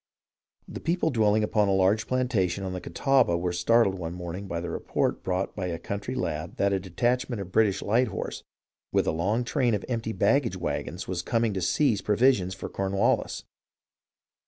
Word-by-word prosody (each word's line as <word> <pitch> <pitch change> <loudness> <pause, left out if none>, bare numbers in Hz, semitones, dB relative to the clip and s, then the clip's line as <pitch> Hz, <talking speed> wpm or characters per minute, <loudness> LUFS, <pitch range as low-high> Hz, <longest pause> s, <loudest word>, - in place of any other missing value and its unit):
The - - -7
people 165 0 0
dwelling 110 -3 +3
upon 105 -1 +2
a 95 - +2
large 95 +4 +2
plantation 105 -8 0
on 95 -1 -3
the 90 - -5
Catawba 130 -11 +2
were 90 +1 -1
startled 115 +2 +3
one 85 0 -5
morning 90 +2 -6
by 85 -2 -3
the 85 0 -4
report - - -1
brought 95 +1 -2
by 95 -3 -3
a 85 -2 -3
country 100 +8 -5
lad 90 - -3
that 100 0 +2
a 95 - +1
detachment 120 +6 -1
of 95 -2 -6
British 100 -1 +2
light 120 +5 +2
horse 95 - -5 0.5
with - - +2
a - - +1
long 100 +9 0
train 120 -2 +1
of 100 - -4
empty 115 -3 -2
baggage 120 -3 +2
vi^agons 90 0 -4
was 90 -1 -2
coming 115 +3 0
to 95 - -2
seize 105 - +2
provisions 105 -4 +2
for 95 - -6
Cornwallis. 95 0 0
100 Hz, 180 wpm, -27 LUFS, 90-120 Hz, 0.5 s, dwelling